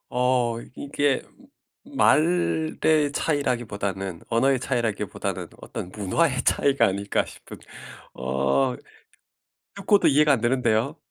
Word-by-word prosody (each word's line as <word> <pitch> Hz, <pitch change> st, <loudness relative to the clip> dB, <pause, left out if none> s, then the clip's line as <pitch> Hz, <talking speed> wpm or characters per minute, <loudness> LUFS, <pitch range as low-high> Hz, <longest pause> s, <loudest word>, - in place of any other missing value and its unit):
어 125 Hz, -2 st, +1 dB, 0.2 s
이게 140 Hz, -1 st, 0 dB, 0.6 s
말의 170 Hz, -, +1 dB, 0.4 s
차이라기보다는 100 Hz, -, -2 dB
언어의 130 Hz, +3 st, +2 dB
차이라기보다는 120 Hz, -5 st, -3 dB
'어떤 90 Hz, -, -7 dB
문화의 130 Hz, -, 0 dB
차이가 140 Hz, -1 st, +3 dB
아닐까?' 100 Hz, +1 st, -1 dB
싶은 -, -, -12 dB, 0.6 s
어 65 Hz, +1 st, 0 dB, 1.0 s
듣고도 200 Hz, 0 st, +3 dB
이해가 150 Hz, +1 st, +4 dB
안 130 Hz, -, +1 dB
되는데요. 120 Hz, +2 st, +1 dB
125 Hz, 255 characters per minute, -24 LUFS, 100-145 Hz, 1.0 s, 이해가